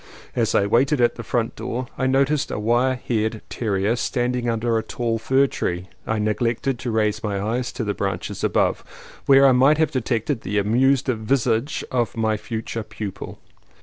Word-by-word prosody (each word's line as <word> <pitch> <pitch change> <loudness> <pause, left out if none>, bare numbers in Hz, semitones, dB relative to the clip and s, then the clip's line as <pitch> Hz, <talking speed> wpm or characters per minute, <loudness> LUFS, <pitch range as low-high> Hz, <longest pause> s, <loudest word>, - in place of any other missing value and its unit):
As 115 -3 +1
I 100 - +4
waited 130 +7 +2
at 120 -1 +3
the - - -7
front 115 0 -1
door 125 +2 -4
I 130 - 0
noticed 140 +2 +2
a - - -3
wire 120 +5 +2
haired 110 -3 -2
terrier 105 -1 0
standing 125 -1 -1
under 115 0 0
a 110 - +2
tall 115 0 -2
fir 130 +4 +3
tree; 90 -8 -3 0.2
I 110 - 0
neglected 115 +4 0
to 130 - -4
raise 110 -1 0
my 100 -2 -1
eyes 120 +5 -2
to - - -3
the 105 -2 -1
branches 100 -1 -4
above, - - +1 0.4
where 135 0 +7
I 135 - +7
might 135 +4 +5
have 160 -1 +2
de 130 -3 -1
tected 115 +2 -1
the 105 +2 -3
amused 125 +6 +3
visage 120 +1 0
of 120 -2 -1
my 110 -1 +1
future 115 +1 -4
pupil. 105 -2 -7
115 Hz, 180 wpm, -22 LUFS, 110-130 Hz, 0.4 s, where